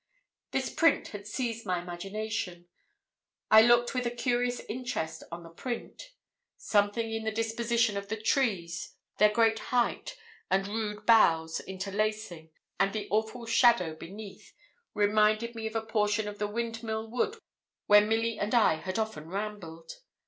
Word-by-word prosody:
This - - -2
print 330 - +3
had 205 -1 -8
seized 230 0 -3
my 185 -3 -1
imagination. 180 0 -5 0.8
I 220 - +10
looked 240 +2 +4
with 250 -2 -1
a - - +1
curious 245 0 0
interest 215 -10 -4
on 170 0 -7
the 165 - -11
print: 250 - -6 0.4
something 215 +2 +1
in 225 0 -3
the 220 - -1
disposition 230 0 0
of 200 0 -5
the 220 +2 -3
trees, 195 -8 -1 0.2
their 210 +1 +7
great 225 +1 +2
height, 250 - -1 0.3
and 195 +1 +1
rude 210 0 -4
boughs, 165 -8 +4
interlacing, 195 -3 -3 0.3
and 195 0 +2
the 215 -1 -3
awful 220 +3 -1
shadow 230 -7 +4
beneath, 195 +6 -11 0.4
reminded 215 +2 +2
me 225 -1 -4
of 220 - -8
a 225 0 -1
portion 210 -1 0
of 205 0 -7
the 210 - 0
Windmill 225 0 -3
Wood 420 - -1 0.5
where 205 0 +7
Milly 225 +2 0
and 210 +4 0
I 215 -9 +4
had 185 +4 -4
often 220 -9 -3
rambled. 185 - -6
215 Hz, 150 wpm, -29 LUFS, 195-230 Hz, 0.8 s, I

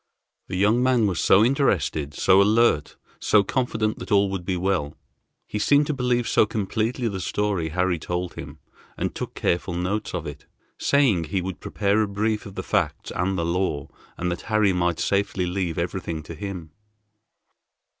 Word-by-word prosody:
The 90 - -4
young 105 +5 +3
man 125 -3 +3
was 95 -5 0
so 105 +4 +5
interested, 90 - 0
so 95 +1 +5
alert, 105 -7 +2 0.2
so 105 -2 +4
confident 110 -2 -1
that - - -8
all 100 -1 +4
would 95 -2 -3
be 90 0 -1
well. 90 -6 -1 0.5
He 105 - -4
seemed 145 +7 +4
to 150 - -1
believe 125 -3 0
so - - +3
completely 110 +4 -1
the 100 -3 -3
story 95 -3 -1
Harry 90 +1 0
told 90 +2 -3
him, - - -9 0.4
and - - -2
took - - -6
careful 85 0 -1
notes 100 +4 -2
of - - -4
it, - - -8 0.3
saying 125 - +3
he 95 +5 -1
would 95 0 -5
prepare 100 +1 0
a 105 - +1
brief 105 +1 -1
of 100 - -11
the 95 - -4
facts 85 -8 -1
and 95 +2 -1
the 85 - -1
law, 85 -5 -1 0.3
and 90 0 -1
that 85 - -4
Harry 110 -3 +3
might 85 -2 0
safely 100 -2 0
leave 90 -2 -2
everything 85 -2 -3
to 85 - -8
him. 90 -2 -7
95 Hz, 175 wpm, -24 LUFS, 90-110 Hz, 0.5 s, so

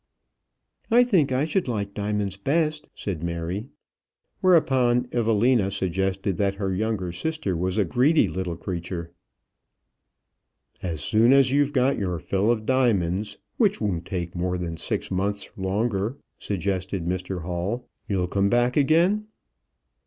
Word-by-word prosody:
"I 240 +1 +6
think 185 - +2
I 130 +3 +1
should 165 +2 0
like 100 -4 -2
diamonds 105 -2 -2
best," 150 +7 0
said 90 -6 -4
Mary. 85 +6 -3 0.7
Whereupon 130 -9 +3
Evelina 115 -2 +2
suggested 95 0 -1
that 100 0 +1
her 100 -2 -2
younger 100 -3 -1
sister 130 - -2
was 90 +3 -1
a 105 - +3
greedy 130 - +3
little 90 0 -3
creature. 85 0 -5 1.7
"As 85 -5 -3
soon 115 - +4
as 135 -1 +5
you've 145 +1 +2
got 130 0 +2
your 90 -4 -1
fill 100 +5 0
of 110 -2 +1
diamonds, 105 -6 +1 0.2
which 210 -3 +2
won't 90 -5 -2
take 90 -2 -3
more 90 +1 -1
than 85 -2 -4
six - - -3
months 100 +2 -1
longer," 100 +4 -1 0.2
suggested 95 -2 -2
Mr 90 0 -3
Hall, 90 +8 -3 0.2
"you'll 95 -3 0
come 100 +2 +1
back 120 +2 +2
again?" 170 +9 +3
100 Hz, 135 wpm, -25 LUFS, 90-125 Hz, 1.7 s, I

